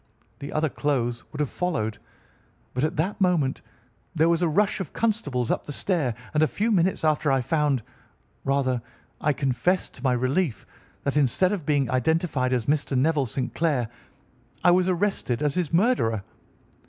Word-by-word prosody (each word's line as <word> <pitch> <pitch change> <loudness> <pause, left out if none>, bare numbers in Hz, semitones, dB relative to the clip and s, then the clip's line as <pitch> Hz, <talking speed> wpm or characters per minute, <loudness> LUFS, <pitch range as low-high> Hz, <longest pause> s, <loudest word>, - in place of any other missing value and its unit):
The 140 - -6
other 155 +1 +1
clothes 125 -5 -1
would 150 - -8
have 145 - 0
followed, 110 -12 -2 0.7
but 125 - -1
at 155 - 0
that 185 +7 -1
moment 165 -8 +2 0.5
there 160 +1 +4
was 170 0 +2
a 175 - +3
rush 205 +7 +2
of 185 -7 -5
constables 145 - 0
up - - -2
the - - -4
stair, 145 - 0 0.2
and 150 - +2
a 155 - +5
few 220 +8 -1
minutes 185 -3 +2
after 155 -2 +2
I 135 -1 +3
found, 145 -2 +1 0.6
rather, 135 -3 +1 0.4
I 150 - +3
confess, 140 +6 0
to - - -15
my 130 -2 +3
relief, 130 +3 0 0.4
that 140 +1 0
instead 150 +7 +3
of 185 -8 -3
being 145 -3 +2
identified 135 0 +1
as 125 -3 0
Mr. 140 -1 +1
Neville 145 0 +2
St. 125 +3 -3
Clair, 145 -9 0 0.7
I 175 - +6
was 180 +1 +3
arrested 180 - 0
as 145 -2 +1
his 175 -5 -1
murderer. 165 - +2
150 Hz, 170 wpm, -25 LUFS, 130-175 Hz, 0.7 s, I